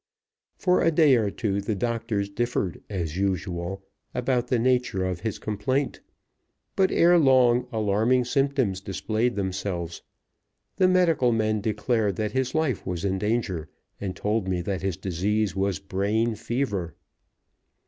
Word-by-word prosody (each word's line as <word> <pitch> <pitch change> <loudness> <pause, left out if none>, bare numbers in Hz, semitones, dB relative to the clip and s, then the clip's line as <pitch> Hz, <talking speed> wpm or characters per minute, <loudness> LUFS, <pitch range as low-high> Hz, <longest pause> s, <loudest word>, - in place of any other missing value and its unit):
For 180 -1 +2
a - - +4
day 150 -4 +5
or 110 -4 +1
two 100 0 -2
the 105 +2 -2
doctors 115 -1 -1
differed, 100 -3 -2
as 85 -5 -3
usual, 95 -1 -2 0.3
about 125 -1 0
the 125 - +2
nature 125 -6 +1
of 90 -2 -2
his 105 +2 -3
complaint, 130 +7 -2 0.7
but 190 -1 +3
ere 175 +1 +5
long 125 -4 +4
alarming 110 +4 +2
symptoms 135 -7 0
displayed 110 +5 -1
themselves. 95 -3 -3 0.8
The 185 - +5
medical 170 -9 +3
men 110 -2 +1
declared 105 -1 0
that 105 +1 -2
his 130 +3 -1
life 155 -9 0
was 90 0 -3
in 95 -1 0
danger, 105 -7 -1 0.3
and 95 -2 -4
told 105 -1 -1
me 90 -2 0
that 95 0 -2
his 95 -3 -2
disease 100 +3 -1
was 95 -1 0
brain 100 +4 0
fever. 105 - -2
105 Hz, 140 wpm, -26 LUFS, 95-125 Hz, 0.8 s, day